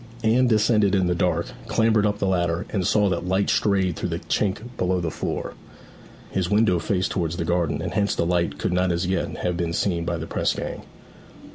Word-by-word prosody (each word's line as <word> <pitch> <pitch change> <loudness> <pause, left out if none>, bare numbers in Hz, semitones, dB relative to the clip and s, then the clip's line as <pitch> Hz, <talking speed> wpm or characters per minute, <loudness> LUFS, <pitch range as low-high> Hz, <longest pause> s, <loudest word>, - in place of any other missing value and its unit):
Anne 120 +3 +4
descended 105 -3 +3
in 95 -2 +2
the 90 - +1
dark, 85 -1 0 0.2
clambered 110 -2 +3
up 105 0 -1
the 100 - -1
ladder, 90 0 0
and 95 -4 0
saw 105 -1 +3
that 90 -1 -2
light 95 +2 +1
strayed 95 -4 +1
through - - -3
the - - -2
chink 100 0 -1
below 90 0 0
the 85 -2 -2
door. - - -3 0.8
His 95 -2 -1
window 105 -4 +3
faced 95 +1 -1
towards 85 -2 -2
the 85 - -2
garden, 85 -3 0
and 90 - -4
hence 100 0 +1
the - - 0
light 85 0 0
could - - -1
not 90 0 +2
as 85 +1 -1
yet 95 +1 -2
have 90 - 0
been 85 -1 -2
seen 85 -2 0
by 85 0 -2
the 80 - -5
press - - -1
gang. - - -5
90 Hz, 215 wpm, -24 LUFS, 85-100 Hz, 0.8 s, Anne